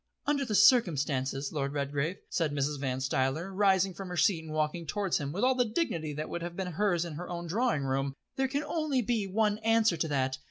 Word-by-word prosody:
"Under 285 -1 +1
the 215 -4 -1
circumstances, 140 - +3
Lord 140 -2 -2
Redgrave," 145 +5 -1
said 165 -4 0
Mrs. 145 0 -1
Van 130 -1 -2
Stuyler, 135 +8 -1
rising 190 -1 +3
from 195 +1 -7
her 180 - -5
seat 175 -6 +3
and 160 - -8
walking 155 +2 -1
towards 195 +2 0
him 140 -1 -3
with 190 +8 -2
all 260 +1 +5
the 250 -1 +2
dignity 215 - -2
that 150 +2 -4
would 170 - -4
have 170 0 -5
been 185 -1 -3
hers 175 -1 +1
in 170 - -6
her 175 +4 -7
own 175 -1 -4
drawing 200 - 0
room, 135 0 -1 0.2
"there 265 0 +1
can 280 +3 -2
only 305 -7 0
be 220 -3 0
one 210 +2 +1
answer 225 -4 +3
to 160 - 0
that. 130 -3 -1
170 Hz, 225 wpm, -30 LUFS, 145-210 Hz, 0.2 s, all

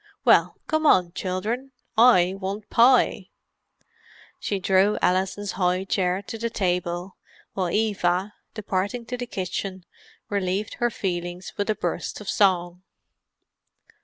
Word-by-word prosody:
Well, - - +4
come 315 0 +1
on, 180 -9 +4
children—I 220 0 +1
want 200 +2 -5
pie!" 235 -5 +4 1.1
She 200 - -2
drew 190 +3 +3
Alison's 190 +2 0
high 180 0 0
chair 190 0 0
to 225 - -7
the 230 +1 -1
table, 180 -2 -2 0.4
while 185 -2 -1
Eva, 200 -1 0 0.2
departing 205 +3 -2
to 250 +1 -4
the 245 0 -5
kitchen, 190 -1 -4 0.4
relieved 200 +1 -2
her 240 - +2
feelings 175 -3 -4
with 205 +1 -2
a 215 - +2
burst - - -3
of 210 - -11
song. 180 -3 +1
195 Hz, 120 wpm, -24 LUFS, 180-215 Hz, 1.1 s, Well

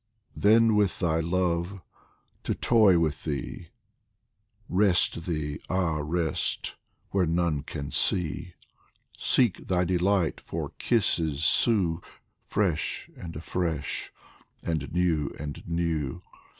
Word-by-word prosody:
Then 110 +1 +5
with 105 -3 +2
thy 80 -2 +1
love 90 +2 0 0.7
to - - 0
toy 110 -6 +5
with 80 -3 0
thee, 75 +3 -4 1.0
Rest 90 -3 +2
thee, 75 -4 -2
ah, 85 -4 0
rest! 80 0 -1 0.4
where 95 -3 +2
none 85 -3 +1
can 70 -1 -6
see; 90 0 +1 0.6
Seek 120 -7 +1
thy 90 -1 +2
delight, 90 -1 +1
for - - -5
kisses 80 - +1
sue, 90 -3 +3 0.5
Fresh 95 -7 -1
and 85 -1 -8
afresh 80 -1 -2 0.5
and 80 -4 -2
new 85 -4 0
and 75 -1 -6
new 85 -1 -1
85 Hz, 105 wpm, -27 LUFS, 80-95 Hz, 1.0 s, Then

